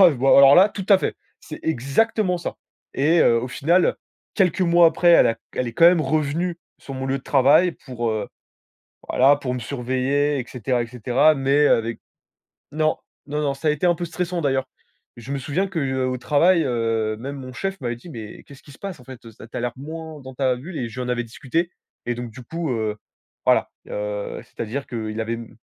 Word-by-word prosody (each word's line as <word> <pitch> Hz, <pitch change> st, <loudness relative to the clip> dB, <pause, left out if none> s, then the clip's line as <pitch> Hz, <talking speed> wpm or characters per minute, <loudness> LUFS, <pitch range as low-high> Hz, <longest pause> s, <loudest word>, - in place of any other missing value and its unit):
Ah, 180 Hz, -3 st, +9 dB
bah, 135 Hz, -1 st, 0 dB
alors 140 Hz, 0 st, +8 dB
là, 190 Hz, +3 st, +7 dB
tout 200 Hz, -2 st, -6 dB
à 195 Hz, -3 st, +7 dB
fait, -, -, -2 dB, 0.2 s
c'est 155 Hz, -, -9 dB
exactement 180 Hz, -, +1 dB
ça! 170 Hz, -, -5 dB, 0.4 s
Et 160 Hz, +5 st, +3 dB
heu, 115 Hz, 0 st, +4 dB
au 125 Hz, -, -4 dB
final, 165 Hz, +7 st, +2 dB, 0.4 s
quelques 185 Hz, -1 st, +2 dB
mois 170 Hz, -1 st, +5 dB
après, 165 Hz, +2 st, +2 dB
elle 170 Hz, -, +7 dB
a 115 Hz, -, +1 dB
q -, -, -33 dB
elle 125 Hz, -, -1 dB
est -, -, -7 dB
quand 165 Hz, -, +4 dB
même 175 Hz, -2 st, +3 dB
revenue 155 Hz, +3 st, -1 dB, 0.2 s
sur 135 Hz, -, -9 dB
mon 130 Hz, 0 st, -4 dB
lieu 135 Hz, +1 st, -1 dB
de -, -, -15 dB
travail 150 Hz, +7 st, +4 dB
pour 120 Hz, -4 st, -3 dB
heu, 110 Hz, -1 st, -3 dB, 0.8 s
voilà, 135 Hz, +3 st, +5 dB
pour 130 Hz, -3 st, -4 dB
me 125 Hz, -, -3 dB
surveiller, 135 Hz, +4 st, -1 dB
et 125 Hz, -, -4 dB
cetera, 125 Hz, 0 st, -1 dB
et -, -, -7 dB
cetera. 125 Hz, +6 st, +2 dB
Mais 140 Hz, +2 st, +3 dB
avec 115 Hz, 0 st, +1 dB, 0.7 s
non, 155 Hz, +1 st, +1 dB, 0.3 s
non 150 Hz, +1 st, -2 dB
non, 140 Hz, -1 st, 0 dB
ça 145 Hz, +3 st, -2 dB
a -, -, +5 dB
été 150 Hz, +4 st, 0 dB
un 175 Hz, -, +4 dB
peu 175 Hz, -, -4 dB
stressant, 175 Hz, +1 st, -3 dB
d'ailleurs. 135 Hz, -3 st, 0 dB, 0.5 s
Je 120 Hz, +4 st, -7 dB
me 140 Hz, -, -1 dB
souviens 155 Hz, +9 st, -1 dB
que, 190 Hz, -3 st, -5 dB
heu, 130 Hz, -2 st, -1 dB
au 130 Hz, -, -2 dB
travail, 165 Hz, +7 st, +3 dB
heu, 115 Hz, -3 st, -1 dB
même 140 Hz, +5 st, -6 dB
mon 130 Hz, -2 st, -8 dB
chef 195 Hz, +7 st, -4 dB
m'avait 120 Hz, -2 st, -3 dB
dit: 120 Hz, -, -14 dB
«Mais 110 Hz, -6 st, -9 dB
qu'est-ce 140 Hz, -1 st, -15 dB
qui 145 Hz, -, -16 dB
se -, -, -16 dB
passe, 195 Hz, -8 st, -7 dB
en -, -, -16 dB
fait, 130 Hz, -2 st, -12 dB
heu, 115 Hz, -, -11 dB
ça 110 Hz, -, -13 dB
tu -, -, -9 dB
as -, -, -2 dB
l'air 120 Hz, 0 st, -2 dB
moins 155 Hz, +2 st, -8 dB
dans 130 Hz, -1 st, -10 dB
ta 130 Hz, -1 st, +1 dB
bulle?» 160 Hz, +7 st, -9 dB
et 120 Hz, -, -3 dB
je 125 Hz, +3 st, -8 dB
lui -, -, -2 dB
en -, -, -6 dB
avais 120 Hz, -1 st, -1 dB
discuté 160 Hz, +9 st, -2 dB, 0.4 s
et 120 Hz, -, 0 dB
donc 120 Hz, 0 st, -6 dB
du 120 Hz, +3 st, -11 dB
coup, 165 Hz, +4 st, -4 dB
heu, 110 Hz, -3 st, -1 dB, 0.5 s
voilà, -, -, +3 dB, 0.2 s
heu, 105 Hz, 0 st, -4 dB
c'est-à-dire 120 Hz, +5 st, -5 dB
qu'il 110 Hz, -2 st, -4 dB
avait 115 Hz, +1 st, -2 dB
m 115 Hz, -1 st, -10 dB
135 Hz, 230 wpm, -22 LUFS, 120-160 Hz, 0.8 s, Ah